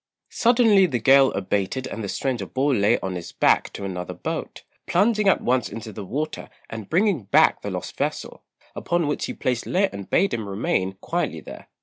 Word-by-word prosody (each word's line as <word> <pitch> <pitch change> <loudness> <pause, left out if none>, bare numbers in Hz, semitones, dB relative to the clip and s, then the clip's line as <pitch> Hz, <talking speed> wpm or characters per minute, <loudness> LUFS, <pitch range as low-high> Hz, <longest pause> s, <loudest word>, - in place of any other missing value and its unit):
Suddenly 230 -5 +4
the 130 -7 -1
gale 135 +3 +5
abated 100 +6 -2
and 115 -3 -6
the 100 - -4
stranger 120 -6 -2
bore 135 +2 0
Lê 105 +1 +3
on 95 -1 -2
his 90 -2 -6
back - - +2
to 100 - -6
another 90 -2 -5
boat, - - -5 0.2
plunging 210 -1 +2
at - - +2
once 125 +1 +1
into 110 -1 -8
the 105 - -7
water 150 +10 -4 0.2
and 110 -3 -7
bringing 180 - +1
back 100 - +4
the - - -4
lost - - -5
vessel, - - -3 0.3
upon 175 -1 0
which 145 0 -1
he - - -5
placed 125 -2 -2
Lê 190 +2 +1
and 100 -1 -8
bade 195 - +2
him 110 -3 -3
remain 95 -1 -1
quietly - - -2
there. - - -11
125 Hz, 195 wpm, -23 LUFS, -, 0.3 s, gale